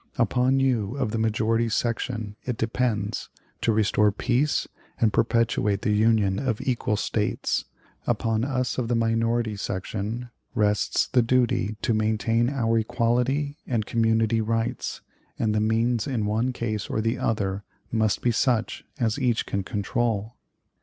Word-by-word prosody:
Upon 125 +3 +2
you 125 -3 +1
of 110 - -1
the 115 - -1
majority 110 +1 +1
section 115 -2 -2
it 125 -3 -3
depends 115 -2 -1 0.3
to 115 - +2
restore 105 -1 +3
peace 130 +7 +1 0.3
and 110 -2 +3
perpetuate 110 -3 +1
the 110 - +1
Union 105 -3 +3
of 125 -6 -1
equal 120 -4 0
States; 105 0 -1 0.4
upon 115 -1 +1
us 130 -1 -1
of 120 - -1
the 120 - +1
minority 115 0 +1
section 105 +5 -4 0.2
rests 105 -1 +2
the 125 - +3
duty 120 -3 +1
to 115 - +2
maintain 110 +2 +1
our 115 -5 +1
equality 125 +5 0
and 115 -4 0
community 115 0 +2
rights; 115 +1 -2 0.4
and 110 -2 +1
the 105 - +2
means 115 +1 +1
in 120 -6 -1
one 110 +5 +1
case 110 -4 -3
or - - -1
the 115 +3 0
other 100 -5 -1 0.3
must 110 -2 +1
be 120 - +3
such 115 -1 0 0.2
as 115 +1 0
each 120 -4 +1
can 100 - -2
control." 105 +2 -1
115 Hz, 145 wpm, -25 LUFS, 110-120 Hz, 0.4 s, restore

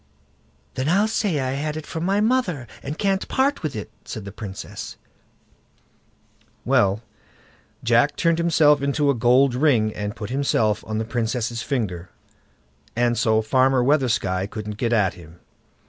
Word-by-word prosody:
"Then 130 +3 -1
I'll 200 +5 +3
say 205 -8 0
I 130 -1 -1
had 150 +3 -3
it 155 - -6
from 165 +1 -4
my 200 +2 +2
mother, 215 - +1 0.2
and 145 +4 -5
can't 195 -1 0
part 275 +2 +1
with 155 -4 -3
it", 105 0 -6
said 110 -3 -7
the 100 - -7
Princess. 100 -1 -8 1.7
Well, 100 +3 +2 0.8
Jack 120 +5 +3
turned 165 -1 +1
himself 155 -4 +4
into 140 +1 +2
a - - +1
gold 125 +2 +4
ring, 125 -6 +2
and 105 +1 -4
put 105 -2 -6
himself 115 -6 +1
on 110 0 -2
the 110 - -1
Princess' 115 0 -2
finger, 95 -11 -3 0.9
and 120 0 +2
so 110 -1 +2
Farmer 130 +2 +3
Weathersky 120 -9 +1
couldn't 105 -1 -6
get 120 +1 -1
at 105 -6 +2
him. 85 0 -15
125 Hz, 150 wpm, -23 LUFS, 110-150 Hz, 1.7 s, himself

